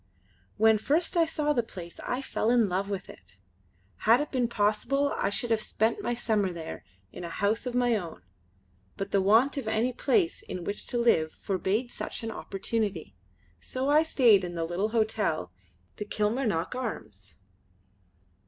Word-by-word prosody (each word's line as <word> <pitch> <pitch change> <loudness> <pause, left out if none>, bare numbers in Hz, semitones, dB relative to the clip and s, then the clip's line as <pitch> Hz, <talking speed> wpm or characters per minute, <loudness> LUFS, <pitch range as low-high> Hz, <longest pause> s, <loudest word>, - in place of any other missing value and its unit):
When 220 0 +5
first 315 - +1
I 335 -1 +5
saw 300 -2 0
the 245 - +2
place 180 -6 -10
I 250 +2 -2
fell 225 - -1
in 235 -3 +4
love 190 +2 -1
with 195 -2 -4
it. 90 0 -15 0.6
Had 230 +3 +4
it 295 - -3
been 250 -3 +1
possible 235 +6 +1
I - - 0
should 230 +3 -1
have 220 -1 +2
spent 220 +1 0
my 240 - -1
summer 215 -5 0
there, 165 -2 -7 0.3
in 180 - -8
a 170 - -5
house 210 +7 0
of 245 - -3
my 245 -2 +3
own, 170 - -5 0.7
but 195 0 -4
the 200 - +3
want 225 +9 +4
of 265 -5 -3
any 225 +3 +1
place 220 - +1
in 180 - -6
which 205 +4 -3
to 245 - -1
live 160 -10 +3
forbade 200 +5 -1
such - - -5
an 225 - -3
opportunity. 200 - -3 0.4
So 260 - -3
I 300 +1 +6
stayed 240 -11 +4
in 175 -1 -5
the 165 -1 -1
little 180 +6 -1
hotel, 215 - 0 0.5
the 210 - -4
Kilmarnock 210 -4 -1
Arms. 110 - -6
220 Hz, 170 wpm, -28 LUFS, 190-245 Hz, 0.7 s, I